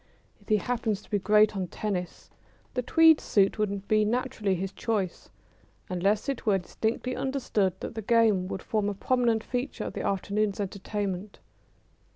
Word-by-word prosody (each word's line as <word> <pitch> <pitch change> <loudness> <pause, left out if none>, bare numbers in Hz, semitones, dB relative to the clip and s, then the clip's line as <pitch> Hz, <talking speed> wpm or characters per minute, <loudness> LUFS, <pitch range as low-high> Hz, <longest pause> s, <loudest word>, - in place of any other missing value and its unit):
If - - -20
he 215 - +5
happen 225 +1 -1
to 205 - -14
be 205 - +2
great 210 +2 +4
on 190 -2 -2
tennis 180 -1 -4 0.4
the 250 - 0
tweed 320 +5 +5
suit 195 0 +2
would 200 -2 -2
be 215 0 +3
naturally 215 -3 0
his 190 +2 -3
choice, 200 -4 -3 0.6
unless 195 +6 +1
it 275 -3 -2
were 205 -3 +3
distinctly 225 +7 -2
understood 225 -9 0
that - - -5
the 220 - -4
game 215 -4 +3
would 190 - -5
form 210 -2 0
a 205 - -4
prominent 235 0 +1
feature 250 +3 -3
of - - -5
the - - -4
afternoon's 200 +1 -1
entertainment. 200 0 -4
210 Hz, 165 wpm, -28 LUFS, 195-230 Hz, 0.6 s, he